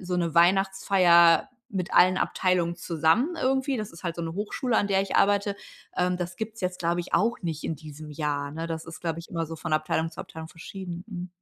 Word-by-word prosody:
so 180 -1 -2
'ne 170 -2 -1
Weihnachtsfeier 180 +1 +5 0.2
mit 190 -2 -3
allen 185 +1 +6
Abteilungen 175 -2 +1
zusammen 170 - +1
irgendwie- 265 +1 +1
das 215 -4 -5
ist 165 - -13
halt 170 -1 -2
so 170 - -3
'ne 165 0 -3
Hochschule, 220 +4 -1
an 205 - +3
der 195 -1 +3
ich 195 - -2
arbeite- 200 0 +3 0.4
ähm, 180 0 +2
das 175 0 -5
gibt's 220 +2 -5
jetzt, 180 -1 -2
glaube 170 +1 0
ich, 175 - -4
auch 230 +2 +2
nicht 160 -3 -4
in 160 - -2
diesem 155 0 -10
Jahr, 145 -1 -2
ne? 165 +1 -4
Das 165 -1 -4
ist, 165 - -9
glaube 165 -1 -2
ich, 170 - -9
immer 165 -1 -2
so 165 +1 -7
von 160 0 -5
Abteilung 155 +1 0
zu 160 - -8
Abteilung 160 0 -9
verschieden. 175 +1 -8
Mhm. 180 -2 -6
175 Hz, 220 wpm, -27 LUFS, 165-195 Hz, 0.4 s, allen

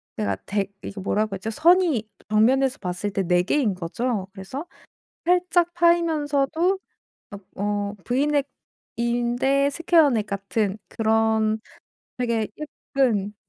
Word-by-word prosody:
내가 100 -2 -1
댁 200 0 -2
이게 200 - -8
뭐라고 210 +1 0
했죠? 205 +4 -5
선이 320 - +3 0.2
정면에서 255 +5 +3
봤을 180 +2 -3
때 195 0 -1
4 180 -1 +4
개인 230 -2 +1
거죠. 195 +4 -2
그래서 205 - -7 0.6
살짝 355 0 +2
파이면서도 335 0 +2 0.6
옆 200 -1 -9
어 205 0 -2
브이넥인데 265 -1 0
스퀘어넥 290 - +3
같은 200 +1 -2
그런 220 -1 +1 0.6
되게 230 -3 0 0.5
예쁜 210 -6 +2
230 Hz, 230 characters per minute, -24 LUFS, 205-285 Hz, 0.6 s, 4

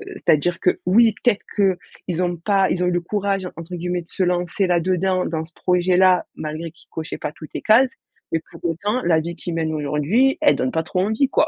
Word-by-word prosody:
c'est-à-dire 170 - +1
que, 180 - +1
oui, 225 +4 +5
peut-être 235 -5 +2
qu'ils 185 -2 -1
ont 175 -1 -1
pas 195 +2 +2
ils 180 - 0
ont 180 - +2
eu - - +2
le 175 0 0
«courage» 195 0 -1
entre 170 +2 -7
guillemets 175 +1 -2
de 170 - -18
se 190 - -1
lancer 180 +2 0
là-dedans, 185 +1 +1
dans 160 -1 -3
ce 160 - -21
projet-là, 180 +1 +3
malgré 155 +2 -5
qu'ils 160 - -24
cochaient 160 -1 -6
pas - - -3
toutes 155 0 -12
les - - -4
cases, 245 +4 +5 0.4
mais 165 - 0
pour - - -11
autant 205 +9 -1
la 165 -2 +3
vie 170 +2 -5
qu’ils 175 0 -5
mènent 160 -1 -1
aujourd'hui, 155 - +1
elle 305 - +5
donne 130 - -1
pas 160 - 0
trop 180 +2 -1
envie, 220 +7 +1
quoi. 305 - +2
180 Hz, 220 wpm, -21 LUFS, 165-195 Hz, 0.4 s, oui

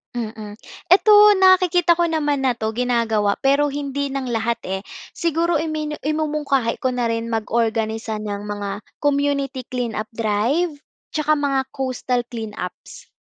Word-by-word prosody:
Mm, 215 -2 -6 0.3
ito 400 +3 +6 0.3
nakikita 360 -2 +5
ko 345 - +1
naman 295 -4 0
na 260 - +3
'to, 220 -2 -3
ginagawa 230 -4 +1
pero 280 +1 +2
hindi 280 0 -3
ng 270 -1 -3
lahat, 230 -1 -1
eh, 190 +1 -2 0.3
siguro 335 +1 0
iminu 305 -1 -2
imumungkahi 295 -5 0
ko 260 - +2
na 245 -1 -1
rin 230 0 -2
mag-organisa 225 -1 -1
ng 205 -1 -5
mga 205 0 -5 0.2
community 280 -2 0
clean 245 -2 -4
up 215 0 -4
drive 230 +10 0 0.4
'tsaka 305 -1 +1
mga 280 -2 +1
coastal 255 -2 -1
clean 225 -3 -6
ups. 180 - -8
255 Hz, 140 wpm, -21 LUFS, 225-295 Hz, 0.4 s, ito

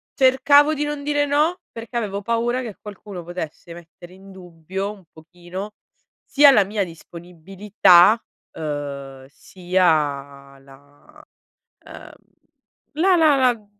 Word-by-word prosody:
cercavo 280 +3 +4
di 295 -1 -3
non 295 -1 -5
dire 290 0 0
no, 305 +5 0
perché 230 +1 -8
avevo 205 -3 -4
paura 235 +3 -1
che 225 -6 -8
qualcuno 200 -3 -10
potesse 170 -1 -8
mettere 175 +1 -15
in 195 +1 -16
dubbio, 185 +2 -7
un 200 -3 -15
pochino, 175 +5 -10 0.5
sia 290 0 +5
la 215 -7 +4
mia 200 +1 -3
disponibilità, 180 +4 +1 0.3
uhm, 140 -3 -7
sia 145 -6 -2
la 140 +1 -21 0.6
uhm, - - -12 0.8
la 360 +4 +2
la 310 -4 +4
la 245 -5 0
190 Hz, 115 wpm, -21 LUFS, 165-245 Hz, 0.8 s, sia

